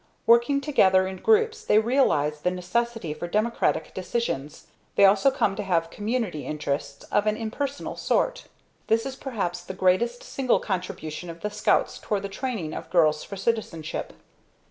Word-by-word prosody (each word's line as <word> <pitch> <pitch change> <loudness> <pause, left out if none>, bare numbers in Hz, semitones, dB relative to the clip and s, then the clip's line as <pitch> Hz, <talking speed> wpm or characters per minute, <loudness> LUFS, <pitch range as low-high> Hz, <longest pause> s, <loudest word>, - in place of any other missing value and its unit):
Working 235 +5 +4
together 190 -11 +4
in 190 0 -5
groups 445 - +2
they 210 - +3
realize 215 - +2
the 180 - +2
necessity 185 0 -2
for 175 - -6
democratic 215 +6 0
decisions. 185 - -3 0.3
They 200 - +7
also 195 +7 +5
come 210 -7 0
to - - -1
have 170 -4 0
community 210 - -2
interests 140 -2 -4
of 205 +1 +2
an 215 0 +1
impersonal 270 +5 -4
sort. - - 0 0.4
This 225 +1 +2
is 270 -1 -4
perhaps 200 -11 -3
the 190 - -8
greatest 205 +6 +1
single 255 -3 +1
contribution 180 -3 -4
of 165 0 -9
the 210 - -3
Scouts 210 0 +1
toward 205 -2 -2
the 200 - -4
training 200 - -4
of - - -7
girls 155 -4 +3
for 200 - -8
citizenship. 190 -7 -2
205 Hz, 160 wpm, -25 LUFS, 175-235 Hz, 0.4 s, They